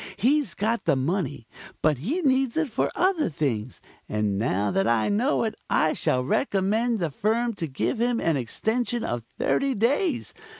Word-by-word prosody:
He's 250 - +2
got 225 +4 -1
the - - +3
money, 135 - -2 0.4
but 150 -4 +3
he 275 - -1
needs 265 -1 +2
it 320 -6 0
for - - 0
other 360 - +2
things, 130 -7 -2 0.3
and 105 -2 0
now 105 -2 0
that 195 +1 +1
I 115 -2 +2
know 235 +8 +1
it 220 -1 -1 0.2
I 155 - +3
shall 125 0 0
recommend 220 - +1
the 170 -6 -2
firm 230 +8 0
to 165 - -3
give 155 - -2
him 240 -1 +1
an 165 - +1
extension 225 - -1
of 120 0 -2 0.2
thirty 275 -2 +1
days. 260 - 0
205 Hz, 170 wpm, -25 LUFS, -, 0.4 s, the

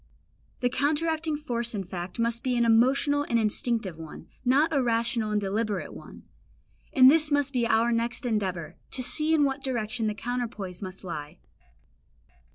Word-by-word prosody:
The 245 - +2
counteracting 310 +3 0
force 235 -5 -3
in 195 - -2
fact 175 0 -7
must 235 0 -1
be 250 -2 0
an 235 - +3
emotional 260 +5 +3
and 235 - +2
instinctive 215 -4 -1
one, 160 -1 -9 0.2
not 275 +6 +3
a 280 - +3
rational 230 -1 0
and 210 0 +1
deliberate 205 0 -2
one; - - -12 0.7
and 260 -2 +8
this 310 0 +5
must 285 -1 +1
be 240 -2 +1
our 230 +1 +3
next 235 +2 -1
endeavour, 185 -8 -2
to 255 - -2
see 305 +5 +2
in 300 - +3
what 275 -1 -1
direction 230 -3 -2
the 210 - -2
counterpoise 220 -6 -4
must 190 0 -8
lie. 155 -2 -6
235 Hz, 165 wpm, -27 LUFS, 210-270 Hz, 0.7 s, and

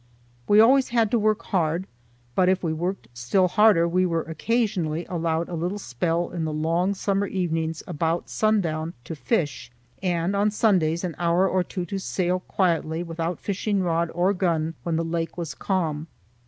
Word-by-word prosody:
We 205 - +6
always 260 +4 +5
had 230 -3 +2
to 235 - +3
work 215 +1 +1
hard, 170 -1 0 0.5
but 185 +4 +3
if 185 0 +1
we 160 -2 0
worked 175 +5 -3
still 125 +11 +2
harder 200 -3 +4
we 180 +2 +2
were 165 -3 0
occasionally 170 -2 -1
allowed 165 -1 -1
a - - -8
little 175 +4 -2
spell 165 +1 -2
in 170 -2 -3
the 155 - -2
long 165 +5 0
summer 200 +1 0
evenings 165 -4 -2
about 165 0 -1
sundown 170 -7 0
to 160 - -6
fish, 150 - -2 0.3
and 180 0 0
on 205 +1 +3
Sundays 185 -6 +2
an 180 -3 -2
hour 175 +2 +3
or 185 0 +1
two 180 0 -5
to 195 +3 -4
sail 185 -1 -1
quietly 170 -3 0
without 165 0 -3
fishing 200 0 -1
rod 170 -1 0
or 185 +3 +2
gun 165 -4 0
when 170 -2 -2
the 165 +1 0
lake 165 +1 -3
was 170 -3 -4
calm. 160 -5 -2
175 Hz, 175 wpm, -25 LUFS, 165-195 Hz, 0.5 s, We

